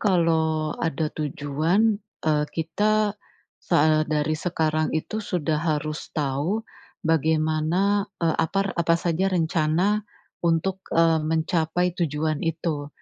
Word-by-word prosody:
kalau 160 -5 +2
ada 160 -1 -1
tujuan, 155 +9 0 0.2
eee, 150 -1 +2
kita 210 +6 +1 0.5
soal 155 -2 +3
dari 150 0 0
sekarang 155 -1 0
itu 215 +7 -3
sudah 160 -7 -1
harus 155 -1 -2
tahu 150 +9 -1 0.4
bagaimana, 160 +5 +1 0.2
eee, 160 - +2
apa- 195 +4 0
apa 170 -1 +2
saja 175 +3 0
rencana 170 +3 +1 0.4
untuk, 170 +3 0 0.2
eee, 165 -1 +4
mencapai 160 +2 0
tujuan 155 -3 -1
itu. 160 -3 -2
160 Hz, 105 wpm, -24 LUFS, 155-180 Hz, 0.5 s, eee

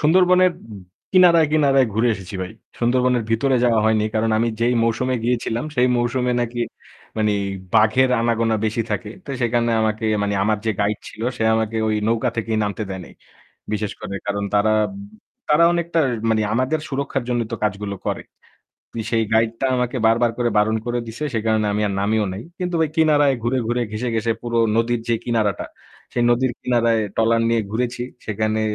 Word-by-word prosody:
সুন্দরবনের 180 +3 +4 0.2
উম 100 - -9 0.3
কিনারায়, 175 -4 +6
কিনারায় 135 -4 +4
ঘুরে 115 +3 +2
এসেছি 95 -1 -9
ভাই। 95 - -6 0.3
সুন্দরবনের 125 0 +2
ভিতরে 130 +4 +2
যাওয়া 115 -2 +3
হয়নি 110 -1 +2
কারণ 110 +1 +1
আমি 115 +1 +1
যেই 120 +1 +2
মৌসুমে 120 +3 0
গিয়েছিলাম 120 0 -1
সেই 125 -1 +3
মৌসুমে 125 +1 0
নাকি 120 0 -3 0.6
মানে 105 -1 +2 0.4
বাঘের 110 +4 +4
আনাগোনা 115 -1 +1
বেশি 110 +1 0
থাকে। - - -3
তো - - -21
সেখানে 120 -1 +1
আমাকে 110 0 -1 0.2
মানে 100 0 0
আমার 105 +1 +1
যে - - +3
গাইড 105 +1 0
ছিল, - - -13 0.2
সে - - -3
আমাকে 110 0 -1
ওই 110 - +1
নৌকা 115 +2 +1
থেকেই 115 -1 -1
নামতে 105 +1 -3
দেয় 95 -1 -5
নাই। - - -15 0.6
বিশেষ 105 -1 -2
করে 100 - -5
কারণ 100 0 -2
তারা, 105 +1 +3 0.8
তারা 150 +2 +5
অনেকটা 170 -1 0 0.3
মানে 110 -1 +2
আমাদের 130 +6 0
সুরক্ষার 135 -1 -2
জন্যই 120 -2 0
তো - - -1
কাজগুলো 100 0 -2
করে। - - -2 0.7
পি 115 - -3
সেই 115 -1 +2
গাইডটা 115 +3 +1
আমাকে 125 +1 -1
বারবার 115 +1 +3
করে 120 -1 +1
বারণ 110 +1 +2
করে 120 0 -1
দিছে। 115 +6 -6
সেই 110 -2 -1
কারণে 110 -1 +2
আমি 105 - 0
আর 100 - -3
নামিও 105 +2 +1
নাই। 100 +4 -7 0.2
কিন্তু 180 -1 -2
ভাই 160 - +2
কিনারায় 150 -3 +4
ঘুরে, 120 +3 +1
ঘুরে, 120 +1 0
ঘেঁষে, 115 +3 -3
ঘেঁষে 115 0 0
পুরো 120 -1 -2 0.2
নদীর 115 +1 +1
যেই 115 -1 +1
কিনারাটা, 110 -5 0 0.5
সেই 120 - +1
নদীর 120 +1 +2
কিনারায় 115 -2 +2 0.2
ট্রলার 115 +1 +3
নিয়ে 115 -1 +2
ঘুরেছি। 120 +2 -2 0.2
সেখানে 110 +1 -1
115 Hz, 180 wpm, -21 LUFS, 110-125 Hz, 0.8 s, কিনারায়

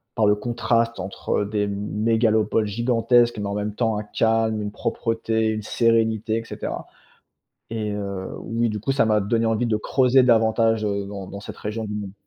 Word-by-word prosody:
par 110 - +2
le 105 - +5
contraste 115 +1 0
entre 95 +2 -2
des 105 0 -1
mégalopoles 110 +2 +1
gigantesques, 120 +1 +2
mais 105 - -3
en 100 - -3
même 105 0 -2
temps 110 -1 0
un 105 - -3
calme, 110 0 +1
une 105 0 -4
propreté, 115 0 -1
une 110 0 -1
sérénité 115 -1 +1
et - - -7
cetera - - -5 0.8
et 110 -2 -3
heu, 100 -2 -4
oui, 115 0 -1
du 105 0 -3
coup, 135 - -1
ça 135 -3 +2
m'a 110 -1 +3
donné 115 +3 0
envie 115 +2 +1
de 110 -2 +1
creuser 130 +4 +3
davantage, 115 -2 +3
heu, 100 -1 -1
dans 100 -2 -7
dans 100 - -8
cette 100 - -9
région 110 +2 -4
du 105 - -5
monde. 100 -2 -5
110 Hz, 185 wpm, -23 LUFS, 105-115 Hz, 0.8 s, le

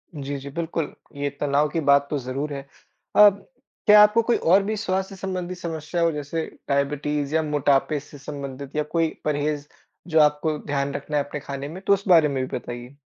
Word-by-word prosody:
जी, 140 -1 -4
जी, 140 +1 -8
बिल्कुल। 165 0 -3 0.2
ये 140 0 -1
तनाव 145 +1 +2
की 165 - -2
बात 140 0 +5
तो 150 - -1
ज़रूर 135 +4 -4
है। 140 - -4 0.5
अ, 210 0 +9 0.6
क्या 210 0 +9
आपको 210 +2 +4
कोई 235 +1 +1
और 190 +4 +4
भी 215 +2 -2
स्वास्थ्य-संबंधी 190 -2 -3
समस्या 165 -1 -4
हो 170 -1 +3
जैसे 150 +2 -3 0.2
डायबिटीज़, 145 +1 0
या 160 - +4
मोटापे 145 0 +1
से 145 0 -13
संबंधित 140 0 -7
या 150 - +1
कोई 165 -1 +2 0.2
परहेज़ 150 0 -1 0.4
जो 160 -2 +3
आपको 150 +1 +3
ध्यान 140 -1 -1
रखना 145 +1 -3
है 145 - +2
अपने 145 - -6
खाने 140 0 -6
में? 180 +5 -8
तो 200 - +3
उस 200 0 -2
बारे 165 -4 +6
में 135 -2 -2
भी - - -4
बताइए। 120 +2 -8
150 Hz, 190 wpm, -24 LUFS, 140-170 Hz, 0.6 s, अ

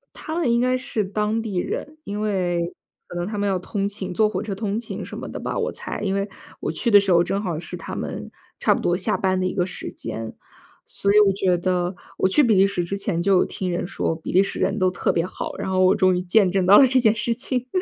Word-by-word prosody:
他 315 - -6
们 330 -8 +1
应 235 +1 +3
该 255 0 +2
是 225 -4 -2
当 210 +3 -1
地 215 -5 -4
人， 300 +11 -3
因 205 +1 -4
为 175 -4 -1 0.3
可 175 - -7
能 175 - -2
他 210 -1 -4
们 205 - 0
要 190 -2 +1
通 195 +2 -3
勤， 195 -3 -5
坐 215 +3 +3
火 - - -3
车 200 -3 -4
通 210 +1 -2
勤 240 - -6
什 - - -8
么 - - -6
的 - - -6
吧， - - -3
我 475 +2 -1
猜。 - - -6
因 195 -2 0
为 200 +1 -1 0.3
我 - - -1
去 235 - -1
的 205 -2 +8
时 195 -2 0
候 170 0 +6
正 195 +3 -1
好 170 -4 -2
是 170 - -7
他 - - -7
们 - - -5 0.3
差 - - +3
不 - - -2
多 175 - +1
下 185 - 0
班 190 -1 +1
的 185 - 0
一 185 - -1
个 180 -2 +1
时 185 - -6
间， 115 0 -6 0.5
所 200 - -1
以 210 - +6
我 200 -2 +5
觉 185 -2 +1
得 180 0 0 0.2
我 190 - +2
去 245 - +4
比 230 -7 +4
利 190 +1 +6
时 195 -3 -1
之 195 +4 -3
前 190 -4 -1
就 195 +2 +3
有 180 - +4
听 185 - -4
人 175 0 -2
说， 175 -3 -2
比 160 - -6
利 185 - +5
时 195 - -2
人 - - 0
都 185 -1 +3
特 180 - 0
别 165 - 0
好， - - -6
然 - - -3
后 185 0 +2
我 185 +1 +6
终 185 -2 +3
于 - - -1
见 185 +1 +3
证 190 0 +1
到 200 +3 +8
了 265 - +7
这 260 - +2
件 220 -3 +4
事 230 +1 -1
情。 250 +1 -2
195 Hz, 295 characters per minute, -23 LUFS, 180-215 Hz, 0.5 s, 的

